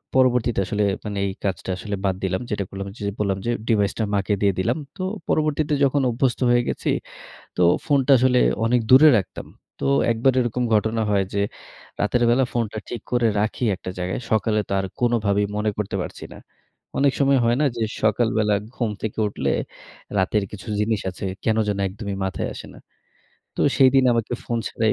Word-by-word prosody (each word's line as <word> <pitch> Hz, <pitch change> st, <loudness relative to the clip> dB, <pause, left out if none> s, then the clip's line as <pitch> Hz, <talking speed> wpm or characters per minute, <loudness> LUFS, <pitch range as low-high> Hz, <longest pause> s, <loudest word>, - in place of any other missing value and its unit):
পরবর্তীতে 125 Hz, -4 st, +3 dB
আসলে 105 Hz, +2 st, -1 dB, 0.2 s
মানে 105 Hz, -1 st, -4 dB
এই 95 Hz, -, -2 dB
কাজটা 95 Hz, -1 st, -3 dB
আসলে 100 Hz, +2 st, -4 dB
বাদ 95 Hz, -1 st, +1 dB
দিলাম। 95 Hz, 0 st, -1 dB
যেটা 105 Hz, -2 st, -1 dB
করলাম, 100 Hz, 0 st, -6 dB, 0.3 s
বললাম 100 Hz, -2 st, 0 dB
যে 120 Hz, -, +1 dB, 0.2 s
ডিভাইসটা 105 Hz, 0 st, +1 dB
মাকে 100 Hz, +1 st, 0 dB
দিয়ে 100 Hz, -2 st, +3 dB
দিলাম। 95 Hz, -, 0 dB, 0.2 s
তো 185 Hz, -, -6 dB, 0.3 s
পরবর্তীতে 150 Hz, -1 st, +1 dB
যখন 140 Hz, +1 st, +3 dB
অভ্যস্ত 120 Hz, +1 st, 0 dB
হয়ে 120 Hz, 0 st, +4 dB
গেছি -, -, -2 dB, 0.7 s
তো 90 Hz, -, +2 dB, 0.2 s
ফোনটা 140 Hz, -2 st, +3 dB
আসলে 125 Hz, 0 st, +3 dB, 0.3 s
অনেক 120 Hz, +2 st, +3 dB
দূরে 140 Hz, +5 st, +9 dB
রাখতাম। 90 Hz, -, -6 dB, 0.3 s
তো -, -, -3 dB, 0.3 s
একবার 120 Hz, +4 st, +2 dB
এরকম 125 Hz, +1 st, -1 dB
ঘটনা 110 Hz, +1 st, +1 dB
হয় 100 Hz, -1 st, +2 dB
যে 100 Hz, -, +1 dB, 0.6 s
রাতের 120 Hz, +4 st, +1 dB
বেলা 130 Hz, +3 st, +3 dB
ফোনটা 115 Hz, -3 st, -2 dB
ঠিক 120 Hz, -, -5 dB
করে 120 Hz, -1 st, +3 dB
রাখি 110 Hz, +3 st, -1 dB
একটা 95 Hz, -, -7 dB
জায়গায়। 90 Hz, +6 st, -2 dB
সকালে 110 Hz, 0 st, +2 dB
তো -, -, -4 dB
আর 95 Hz, -, -3 dB
কোনোভাবেই 105 Hz, -4 st, +2 dB
মনে 105 Hz, 0 st, 0 dB
করতে 105 Hz, -2 st, -2 dB
পারছি -, -, -8 dB
না। -, -, -11 dB, 0.6 s
অনেক 140 Hz, -1 st, +3 dB
সময় 140 Hz, -1 st, +4 dB
হয় 120 Hz, +1 st, +3 dB
না -, -, +3 dB
যে 115 Hz, -, -2 dB, 0.2 s
সকালবেলা 110 Hz, -1 st, +2 dB, 0.2 s
ঘুম 115 Hz, -3 st, -1 dB
থেকে 110 Hz, 0 st, -4 dB
উঠলে 105 Hz, -, -2 dB, 0.7 s
রাতের 100 Hz, +2 st, +1 dB
কিছু 105 Hz, +2 st, -9 dB
জিনিস 105 Hz, -1 st, 0 dB
আছে 90 Hz, -, -8 dB, 0.2 s
কেন 110 Hz, -1 st, +2 dB
যেন 100 Hz, -, -1 dB
একদমই 100 Hz, +1 st, -6 dB
মাথায় 95 Hz, -, -2 dB
আসে -, -, -9 dB
না। -, -, -13 dB, 0.8 s
তো -, -, -3 dB, 0.2 s
সেইদিন 135 Hz, 0 st, +5 dB
আমাকে 115 Hz, 0 st, -1 dB
ফোন 120 Hz, -, -1 dB
ছাড়াই 110 Hz, -1 st, +1 dB
110 Hz, 180 wpm, -23 LUFS, 100-125 Hz, 0.8 s, দূরে